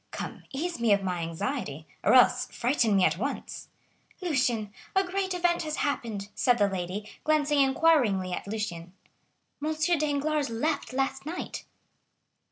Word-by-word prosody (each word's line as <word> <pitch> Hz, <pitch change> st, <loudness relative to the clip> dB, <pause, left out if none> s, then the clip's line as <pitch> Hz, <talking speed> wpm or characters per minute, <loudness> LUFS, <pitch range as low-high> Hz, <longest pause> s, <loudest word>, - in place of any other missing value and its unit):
Come, -, -, -7 dB
ease 325 Hz, +2 st, -3 dB
me 230 Hz, -3 st, +4 dB
of 200 Hz, -1 st, +1 dB
my 180 Hz, -2 st, -1 dB
anxiety, 165 Hz, -, -3 dB, 0.2 s
or -, -, +5 dB
else 250 Hz, -, +5 dB
frighten 240 Hz, -4 st, +1 dB
me 190 Hz, -, +4 dB
at -, -, +1 dB
once." -, -, -4 dB, 0.5 s
"Lucien, 250 Hz, -, 0 dB, 0.2 s
a 385 Hz, -, +5 dB
great 380 Hz, 0 st, -2 dB
event 350 Hz, -1 st, +2 dB
has 310 Hz, -2 st, -3 dB
happened!" 220 Hz, -8 st, -2 dB
said 245 Hz, -1 st, +3 dB
the 205 Hz, -2 st, +4 dB
lady, 190 Hz, +2 st, -4 dB, 0.2 s
glancing 295 Hz, -2 st, +3 dB
inquiringly 265 Hz, -, +3 dB
at -, -, -4 dB
Lucien,—"M. 220 Hz, -, -4 dB
Danglars 295 Hz, 0 st, 0 dB
left 275 Hz, +2 st, -1 dB
last 270 Hz, +1 st, -1 dB
night!" 345 Hz, +3 st, -5 dB
260 Hz, 140 wpm, -28 LUFS, 205-310 Hz, 0.5 s, or